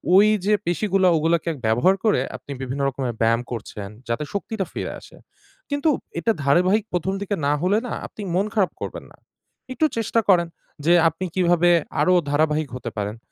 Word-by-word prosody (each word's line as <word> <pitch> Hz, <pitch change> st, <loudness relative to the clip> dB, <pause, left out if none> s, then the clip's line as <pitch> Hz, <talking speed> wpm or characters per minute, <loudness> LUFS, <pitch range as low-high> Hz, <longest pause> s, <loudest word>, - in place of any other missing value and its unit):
ওই 200 Hz, +2 st, +7 dB, 0.2 s
যে 210 Hz, -, +3 dB
পেশিগুলা 190 Hz, +2 st, +1 dB
ওগুলোকে 165 Hz, +2 st, +1 dB, 0.2 s
ব্যবহার 120 Hz, +13 st, +3 dB
করে 210 Hz, -, +3 dB, 0.2 s
আপনি -, -, -12 dB
বিভিন্ন 135 Hz, +2 st, -3 dB
রকমের 130 Hz, -2 st, -3 dB
ব্যায়াম 115 Hz, +1 st, +3 dB
করছেন 105 Hz, -3 st, -6 dB, 0.2 s
যাতে 115 Hz, +6 st, -1 dB
শক্তিটা 200 Hz, 0 st, -3 dB
ফিরে -, -, -4 dB
আসে -, -, -16 dB, 0.5 s
কিন্তু 285 Hz, +2 st, +1 dB, 0.3 s
এটা 230 Hz, -, +2 dB
ধারাবাহিক 180 Hz, +9 st, +3 dB
১ম 180 Hz, +2 st, 0 dB
দিকে 205 Hz, 0 st, -1 dB
না 145 Hz, -, +3 dB
হলে 185 Hz, +4 st, +2 dB
না -, -, -4 dB
আপনি -, -, -11 dB
মন 195 Hz, +3 st, +2 dB
খারাপ 195 Hz, -4 st, +2 dB
করবেন -, -, -5 dB
না -, -, -19 dB, 0.6 s
একটু 310 Hz, -, +2 dB
চেষ্টা 230 Hz, 0 st, +1 dB
করেন 175 Hz, -3 st, +5 dB, 0.4 s
যে 170 Hz, -, +5 dB, 0.2 s
আপনি 165 Hz, +4 st, -6 dB
কিভাবে 175 Hz, -1 st, +3 dB, 0.3 s
আরো 185 Hz, -, +4 dB, 0.2 s
ধারাবাহিক 150 Hz, 0 st, +1 dB
হতে 120 Hz, -2 st, -6 dB
পারেন? 105 Hz, +2 st, -3 dB
175 Hz, 170 wpm, -23 LUFS, 140-195 Hz, 0.6 s, ওই